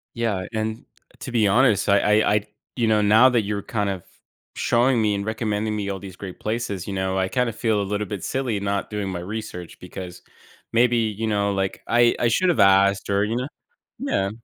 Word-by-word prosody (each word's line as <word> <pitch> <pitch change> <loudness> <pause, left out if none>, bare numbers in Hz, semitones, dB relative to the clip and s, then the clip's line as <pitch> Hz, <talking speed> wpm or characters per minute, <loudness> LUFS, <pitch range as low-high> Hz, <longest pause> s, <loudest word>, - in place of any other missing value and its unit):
Yeah, 110 -6 -1
and 110 +2 -3 0.3
to 130 - -7
be 115 -3 +3
honest, 110 -1 +3
I 105 +2 +4
I 105 - +2
I 105 0 -1 0.3
you 120 -3 +1
know, 110 -1 +3
now 110 +5 +6
that 120 -3 +2
you're 100 0 -3
kind 105 -3 -2
of 95 -3 -4 0.5
showing 120 0 +2
me 105 -1 +2
and 100 0 -3
recommending 110 -1 -2
me 100 -1 -3
all 95 -1 -3
these 95 -2 -10
great 95 -1 -9
places, 105 -4 -3
you 100 - -4
know, 95 0 -1
I 95 0 +1
kinda 125 +2 0
feel 110 -2 0
a - - 0
little 105 +1 -2
bit 100 -1 -5
silly 125 -6 -1
not 100 0 -2
doing 105 -2 -3
my 90 -2 -4
research 90 -2 -7
because 90 -1 -9 0.5
maybe, 120 +1 +4
you 110 -1 -1
know, 100 -1 +1
like, 95 -1 -2
I 120 0 +4
I 120 - +2
should 180 +11 +2
have 175 - +1
asked 100 0 +4
or, 100 0 +2
you 110 +2 -1
know? 125 +2 -2 0.5
Yeah. 100 - -1
105 Hz, 210 wpm, -23 LUFS, 100-115 Hz, 0.5 s, now